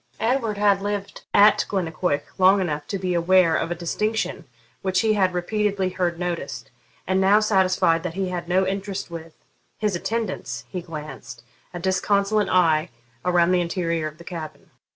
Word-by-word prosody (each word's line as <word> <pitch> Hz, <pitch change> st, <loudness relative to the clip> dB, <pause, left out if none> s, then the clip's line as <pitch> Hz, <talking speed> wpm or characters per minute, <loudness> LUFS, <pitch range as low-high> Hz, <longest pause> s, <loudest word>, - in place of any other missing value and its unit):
Edward 230 Hz, -3 st, 0 dB
had 200 Hz, -1 st, +3 dB
lived 205 Hz, 0 st, -4 dB
at 205 Hz, +1 st, +6 dB
Glennaquoich 175 Hz, -5 st, -1 dB, 0.2 s
long 190 Hz, +2 st, +6 dB
enough 150 Hz, -5 st, -2 dB
to 200 Hz, -, -2 dB
be 185 Hz, -1 st, -2 dB
aware 170 Hz, -1 st, +4 dB
of 165 Hz, -, -1 dB
a 175 Hz, -, -2 dB
distinction 210 Hz, +6 st, -2 dB, 0.4 s
which 190 Hz, -1 st, +1 dB
he 220 Hz, -1 st, +2 dB
had 190 Hz, -3 st, +2 dB
repeatedly 195 Hz, +1 st, -1 dB
heard 180 Hz, -2 st, -1 dB
noticed, 155 Hz, -10 st, -4 dB, 0.3 s
and 190 Hz, +1 st, +1 dB
now 200 Hz, +2 st, +5 dB
satisfied 185 Hz, -5 st, +2 dB
that 175 Hz, -1 st, -5 dB
he 190 Hz, -1 st, -1 dB
had 175 Hz, -1 st, -5 dB
no 190 Hz, +2 st, +3 dB
interest 195 Hz, -1 st, -4 dB
with 165 Hz, -1 st, -8 dB, 0.4 s
his 210 Hz, -3 st, 0 dB
attendants, 215 Hz, +6 st, -3 dB
he 180 Hz, -, -4 dB
glanced 150 Hz, -7 st, -9 dB, 0.3 s
a 175 Hz, -, -6 dB
disconsolate 200 Hz, +3 st, +1 dB
eye 165 Hz, -3 st, +3 dB, 0.3 s
around 175 Hz, -1 st, +3 dB
the 180 Hz, -1 st, +3 dB
interior 170 Hz, -2 st, -1 dB
of 155 Hz, 0 st, -10 dB
the 170 Hz, -, -12 dB
cabin. 165 Hz, -3 st, -8 dB
185 Hz, 165 wpm, -23 LUFS, 170-200 Hz, 0.4 s, at